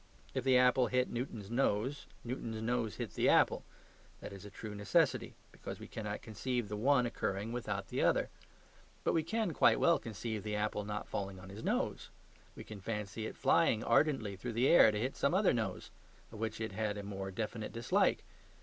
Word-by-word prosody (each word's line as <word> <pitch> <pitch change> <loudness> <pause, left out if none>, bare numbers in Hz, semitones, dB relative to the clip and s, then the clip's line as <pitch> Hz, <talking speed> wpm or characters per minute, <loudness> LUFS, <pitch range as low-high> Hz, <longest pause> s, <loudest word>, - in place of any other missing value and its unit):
If 130 - -1
the 130 -1 +5
apple 125 0 +4
hit 125 +1 +1
Newton's 115 -4 -5
nose, 130 +2 0 0.2
Newton's 115 -2 -4
nose 115 -1 -1
hit - - -5
the - - +2
apple. - - +4 0.6
That - - -8
is 100 0 -10
a - - -8
true 105 +2 -8
necessity: 130 +6 +1 0.2
because - - -8
we - - -9
cannot 105 -2 -5
conceive 120 +1 -3
the 105 - -3
one 125 +3 +3
occurring 105 -2 -2
without 105 -5 -3
the - - -1
other. - - +2 0.7
But - - +2
we 165 - +3
can 215 +3 -1
quite - - +4
well 170 - +4
conceive 110 0 -4
the 105 0 -3
apple 105 0 -1
not 105 0 -4
falling 95 -1 -4
on 95 +1 -11
his 100 +3 -9
nose; - - -1 0.5
we - - -8
can 105 -2 -10
fancy 105 +1 -4
it - - -9
flying 110 0 +3
ardently 115 -6 +2
through 115 +5 -5
the 120 +4 +3
air 170 - +8
to 105 - -2
hit 130 +4 -2
some 140 +6 +1
other 195 0 +4
nose, 115 -2 -3 0.4
of 110 - -10
which 110 0 -3
it 110 -1 -3
had 105 +1 -2
a 100 - -5
more 95 -1 -5
definite 110 +3 -4
dislike. 115 0 +1
110 Hz, 195 wpm, -34 LUFS, 105-125 Hz, 0.7 s, air